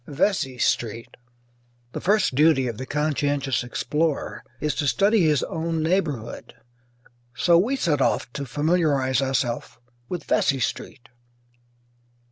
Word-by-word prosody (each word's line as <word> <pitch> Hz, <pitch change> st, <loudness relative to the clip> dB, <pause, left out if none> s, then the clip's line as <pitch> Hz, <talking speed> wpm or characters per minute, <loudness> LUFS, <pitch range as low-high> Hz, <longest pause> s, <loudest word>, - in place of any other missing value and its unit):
VESEY 140 Hz, -3 st, 0 dB
STREET 115 Hz, -1 st, -1 dB, 0.8 s
The -, -, -6 dB
first 205 Hz, -5 st, +2 dB
duty 145 Hz, -2 st, +4 dB
of 115 Hz, -3 st, -5 dB
the 130 Hz, -, -6 dB
conscientious 145 Hz, -3 st, 0 dB
explorer 150 Hz, +5 st, -2 dB, 0.2 s
is 150 Hz, +1 st, -1 dB
to 145 Hz, -, 0 dB
study 205 Hz, +6 st, +3 dB
his 155 Hz, -4 st, +2 dB
own 165 Hz, 0 st, -2 dB
neighbourhood, 160 Hz, -, -2 dB, 0.8 s
so 170 Hz, -1 st, +4 dB
we 240 Hz, +9 st, +1 dB
set 155 Hz, -, 0 dB
off 120 Hz, -, 0 dB
to 140 Hz, -2 st, -5 dB
familiarize 145 Hz, -3 st, +1 dB
ourself 130 Hz, -4 st, -2 dB, 0.3 s
with 175 Hz, -3 st, -4 dB
Vesey 140 Hz, -1 st, +1 dB
Street. 120 Hz, 0 st, -4 dB
145 Hz, 120 wpm, -24 LUFS, 130-165 Hz, 0.8 s, duty